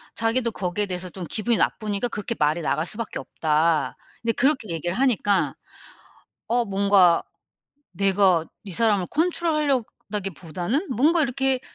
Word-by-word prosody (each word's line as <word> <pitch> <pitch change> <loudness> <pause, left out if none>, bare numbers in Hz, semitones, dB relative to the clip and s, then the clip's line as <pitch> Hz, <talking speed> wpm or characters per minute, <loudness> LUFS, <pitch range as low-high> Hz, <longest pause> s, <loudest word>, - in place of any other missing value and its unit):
자기도 230 +2 +1
거기에 195 +1 -2
대해서 180 -1 -4
좀 180 0 -7
기분이 225 +1 +1
나쁘니까 210 +1 0
그렇게 230 0 -4
말이 155 +3 +2
나갈 155 +1 0
수밖에 215 +4 -4
없다." 155 +3 0 0.3
이제 230 - +2
그렇게 265 -4 +1
얘기를 170 +2 -3
하니까 215 -6 +2 0.9
어 240 +1 +2
뭔가 195 -4 +4 0.7
내가 190 -2 +3 0.2
이 200 - -8
사람을 205 -3 +2
컨트롤하려다기보다는 260 - -1
뭔가 315 +7 +4
이렇게 270 -1 0
205 Hz, 325 characters per minute, -24 LUFS, 175-245 Hz, 0.9 s, 뭔가